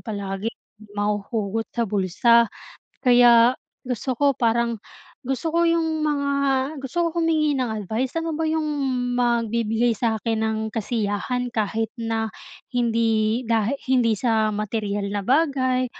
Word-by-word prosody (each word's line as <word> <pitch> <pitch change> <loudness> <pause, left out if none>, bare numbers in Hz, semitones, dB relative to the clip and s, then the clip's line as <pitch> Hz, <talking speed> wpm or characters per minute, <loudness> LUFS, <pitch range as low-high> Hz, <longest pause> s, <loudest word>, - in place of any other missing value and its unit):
palagi 200 -1 -4 0.5
mahuhugot 210 +1 -2
sa 235 -1 -1
bulsa. 215 +4 +3 0.5
Kaya 245 -1 +6 0.2
gusto 250 +1 -3
ko 285 +3 +3
parang 235 -1 +1 0.4
gusto 270 +5 -3
ko 340 - +3
'yong 325 -2 +1
mga 285 -2 0 0.5
gusto 335 +6 -1
ko 340 +1 -1
humingi 310 -3 +2
ng 255 -4 -1
advice. 220 +4 -3
Ano 330 -1 -2
ba 325 - -2
'yong 315 0 0 0.5
magbibigay 235 -1 +1
sakin 220 0 -1
ng 220 0 0 0.2
kasiyahan 225 +2 -2
kahit 220 +1 -1
na 225 -2 -2 0.5
hindi 230 -1 +1
dahi 225 +2 +1
hindi 240 -5 +2
sa 220 -3 +1
materyal 205 -1 -2
na 205 - -1
bagay 260 0 +2
235 Hz, 125 wpm, -23 LUFS, 220-260 Hz, 0.5 s, Kaya